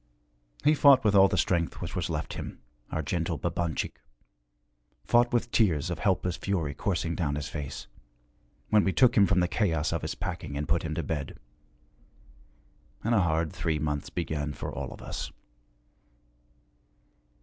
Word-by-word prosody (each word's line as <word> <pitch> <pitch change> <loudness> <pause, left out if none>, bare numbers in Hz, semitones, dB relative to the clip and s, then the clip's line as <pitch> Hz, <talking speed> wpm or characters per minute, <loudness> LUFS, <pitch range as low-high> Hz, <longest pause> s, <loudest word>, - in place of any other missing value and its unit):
He 150 - +5
fought 140 -3 +6
with 105 -2 +3
all 100 -1 +7
the - - -1
strength 85 -2 0
which - - -5
was - - -1
left - - -3
him, - - -6 0.3
our 80 - -1
gentle 80 +1 -1
Babanchik, 85 -2 -2 1.0
fought 120 0 +4
with 120 0 0
tears 90 -6 +2
of 85 - -4
helpless 90 -3 +1
fury 85 -8 -1
coursing 85 +2 -1
down 75 -5 -1
his 75 -1 -3
face, 70 -3 -6 0.9
when 105 -1 +5
we 95 - +1
took 125 -2 +5
him 100 -3 +6
from 90 - +3
the 90 - +2
chaos 80 -6 0
of 85 - -2
his 80 - -4
packing 85 -5 -5
and 75 - -3
put 80 +3 +2
him 80 -1 -4
to 80 - -2
bed. 75 -2 -4 1.7
And 115 - +1
a 105 - +4
hard 80 -1 0
three 85 -3 -1
months 75 -1 -2
began 75 -3 -3
for - - -6
all - - -5
of - - -10
us. - - -5
85 Hz, 165 wpm, -28 LUFS, 75-100 Hz, 1.7 s, all